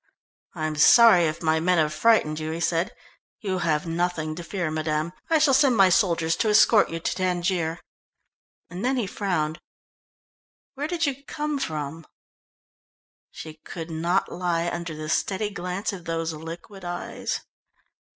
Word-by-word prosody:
"I 155 -2 -3
am 155 -1 -3
sorry 190 +2 +7
if 160 +2 -3
my 160 0 +2
men 180 +2 +2
have 155 -1 +2
frightened 155 -4 +3
you," 155 0 -4
he 160 +1 -4
said. 170 +2 0 0.5
"You 190 -5 -2
have 160 -1 0
nothing 165 -2 -1
to 170 +2 -7
fear, 175 -2 -3
madame. 155 +1 -2 0.2
I 325 - +3
will 275 - +3
send 260 -3 +4
my 195 -1 +6
soldiers 170 -4 +2
to 220 - +1
escort 210 0 +5
you 165 - -4
to 165 - -2
Tangier." 175 -2 -1 0.9
And 180 +3 -7
then 260 +2 +1
he 240 - 0
frowned. 175 -6 -2 1.1
"Where 285 +2 -3
did 335 -1 -1
you 280 -1 -3
come 300 -1 -3
from?" 155 - -4 1.2
She 155 -1 -10
could 165 -1 -7
not 170 +4 0
lie 175 -1 -1
under 170 -2 -5
the 155 0 -6
steady 200 +6 -1
glance 185 +3 -3
of 180 -3 -9
those 165 0 -2
liquid 165 +5 -9
eyes. 175 0 -4
175 Hz, 160 wpm, -25 LUFS, 160-200 Hz, 1.2 s, sorry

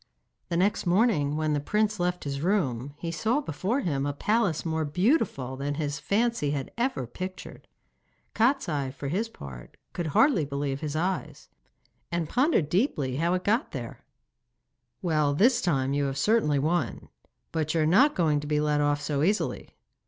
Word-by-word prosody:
The 170 - 0
next 195 +1 +1
morning 175 -7 +2
when 155 -1 0
the 145 - +1
prince 210 +7 0
left 180 0 -1
his 140 -1 -4
room 145 - 0
he 165 +1 -4
saw 225 - +1
before 210 - -2
him 140 - -1
a 145 - -1
palace 200 0 0
more 160 -1 0
beautiful 150 - 0
than 140 +2 -3
his 145 -1 -2
fancy 230 -7 0
had 140 -2 -3
ever 245 - -1
pictured. 185 +10 -8 0.7
Kostiei 220 - +1
for 140 +1 -6
his 210 +9 -1
part 65 - -11 0.2
could 175 -2 -3
hardly 200 - +4
believe 140 -1 -3
his 150 0 -4
eyes, 180 +4 -3 0.6
and 170 -2 -1
pondered 255 - +2
deeply 150 - 0
how 170 +3 +1
it 180 - -1
had - - -25
got 230 +8 +1
there. - - -7 1.0
'Well, 155 -4 +2
this 235 - +4
time 135 -6 +1
you 145 0 +1
have 135 0 -2
certainly 150 -3 +2
won; 150 - -1 0.4
but 155 -1 -1
you 160 - +3
are - - +3
not 210 - +5
going 155 -4 +2
to 145 - -7
be 150 0 +1
let 150 -1 +1
off 145 0 +1
so 145 -1 -1
easily. 200 +7 0
160 Hz, 175 wpm, -27 LUFS, 145-200 Hz, 1.0 s, not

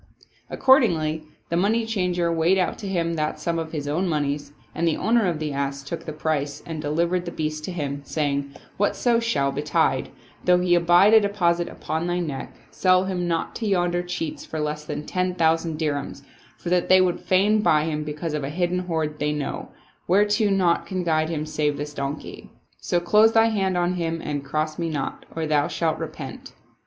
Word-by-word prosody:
Accordingly 160 - +3 0.2
the 170 - -1
money 215 +6 +2
changer 180 -6 0
weighed 165 +4 +3
out 185 - 0
to 205 - -6
him 170 -3 0
that 155 0 -1
sum 170 -1 -1
of 160 -1 -5
his 145 -3 -4
own 175 +6 0
moneys, 145 -2 -1 0.2
and 170 - 0
the 160 - +1
owner 225 -1 +2
of 170 -3 0
the 155 -2 -3
ass 140 0 -2
took 165 +5 -6
the 155 - -4
price 150 -2 -2
and 160 -2 -5
delivered 170 +4 0
the 170 - -4
beast 155 -1 -3
to - - -4
him, 145 -5 -3
saying, 140 -1 -1 0.2
" - - -29
Whatso 230 +3 +2
shall 140 -13 0
betide, 145 +2 0 0.3
though 180 0 +5
he 180 -1 +2
abide 175 +4 +5
a 220 - +9
deposit 175 -5 +1
upon 160 +3 -3
thy 175 0 0
neck, 155 -6 -4 0.2
sell 185 0 +3
him 180 -2 -2
not 165 -1 -1
to 225 - -3
yonder 175 -3 +1
cheats 170 -3 -4
for 160 - -5
less 150 0 -3
than 150 - -5
ten 180 0 -1
thousand 165 -1 +1
dirhams, 145 -3 -3 0.3
for 175 - -5
that 180 -1 +2
they 185 - +7
would 185 -1 +2
fain 205 +3 +3
buy 155 -7 +3
him 155 -1 -2
because 150 +1 -4
of 150 -2 -2
a 135 - -3
hidden 175 +3 0
hoard 160 -4 -2
they 150 0 0
know, 150 -2 -4 0.4
whereto 205 +3 +3
naught 185 -4 +2
can 185 -2 -2
guide 155 -2 +1
them 155 -2 -3
save 150 -2 -1
this 150 0 -5
donkey. 140 +1 -5 0.3
So 175 - 0
close 215 +5 +4
thy 225 0 +5
hand 190 -4 0
on 175 +1 +1
him 165 -2 -2
and 145 -3 -4
cross 155 +4 -2
me 165 -1 -1
not, 145 -4 -4
or 165 -1 -1
thou 150 -2 +2
shalt 165 -2 -1
repent." - - -7
165 Hz, 200 wpm, -24 LUFS, 150-180 Hz, 0.4 s, a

